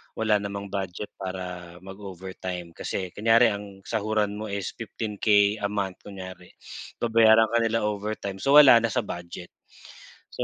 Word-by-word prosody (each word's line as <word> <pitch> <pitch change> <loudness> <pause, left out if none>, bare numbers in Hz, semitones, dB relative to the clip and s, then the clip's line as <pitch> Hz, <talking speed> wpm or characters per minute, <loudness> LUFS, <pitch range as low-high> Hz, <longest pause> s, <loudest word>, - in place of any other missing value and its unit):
wala 110 -2 +2
namang 100 0 -5
budget 95 0 -4
para 90 -2 -6
mag-overtime. 95 -2 -7
Kasi 95 -2 -4
kunyari 115 +3 +5
ang 100 -1 -8
sahuran 105 -2 -1
mo 110 - -5
is 100 -2 -3
15K 105 -2 +1
a 100 - +1
month 100 -3 -3
kunyari 95 -2 -10 0.5
babayaran 115 -1 +5
ka 120 - +3
nila 115 -1 0
overtime 105 -1 -4
so 140 +6 +3
wala 135 -5 +9
na 115 -1 -1
sa 115 - 0
budget. 85 -2 -8 0.8
So - - -3
100 Hz, 145 wpm, -26 LUFS, 95-110 Hz, 0.8 s, wala